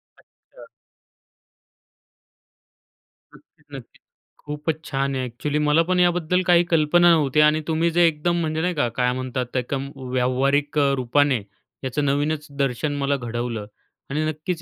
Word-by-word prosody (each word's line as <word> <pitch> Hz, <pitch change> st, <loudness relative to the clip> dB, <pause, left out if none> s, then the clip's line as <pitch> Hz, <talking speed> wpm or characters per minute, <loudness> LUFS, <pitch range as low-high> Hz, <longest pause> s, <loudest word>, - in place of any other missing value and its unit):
अच्छा. -, -, -19 dB, 2.7 s
नक्कीच, -, -, -24 dB
नक्कीच. -, -, -12 dB, 0.4 s
खूपच 150 Hz, +2 st, -4 dB
छान 135 Hz, -1 st, -2 dB
आहे. 130 Hz, -, -2 dB
ॲक्च्युअली 140 Hz, +5 st, -3 dB
मला 150 Hz, +2 st, +3 dB
पण 180 Hz, +1 st, 0 dB
याबद्दल 180 Hz, 0 st, +2 dB
काही 175 Hz, -1 st, +5 dB
कल्पना 170 Hz, +1 st, +4 dB
नव्हती. 150 Hz, -3 st, +2 dB
आणि 150 Hz, +1 st, +4 dB
तुम्ही 165 Hz, +1 st, +1 dB
जे 175 Hz, +1 st, +4 dB
एकदम 165 Hz, +2 st, 0 dB
म्हणजे 160 Hz, -1 st, -2 dB
नाही 180 Hz, +2 st, 0 dB
का 145 Hz, -5 st, +1 dB
काय 125 Hz, 0 st, +2 dB
म्हणतात 130 Hz, 0 st, -3 dB
त्या 125 Hz, -, 0 dB
कम 140 Hz, 0 st, -3 dB, 0.2 s
व्यावहारिक 135 Hz, +4 st, 0 dB
अ, 140 Hz, -1 st, +3 dB
रूपाने 130 Hz, 0 st, +1 dB, 0.4 s
याचं 135 Hz, +3 st, -2 dB
नवीनच 145 Hz, +2 st, -1 dB
दर्शन 140 Hz, +2 st, -1 dB
मला 140 Hz, 0 st, 0 dB
घडवलं. 120 Hz, -3 st, -4 dB, 0.4 s
आणि 150 Hz, +3 st, -1 dB
नक्कीच 155 Hz, +2 st, -3 dB
150 Hz, 140 wpm, -22 LUFS, 135-160 Hz, 2.7 s, काही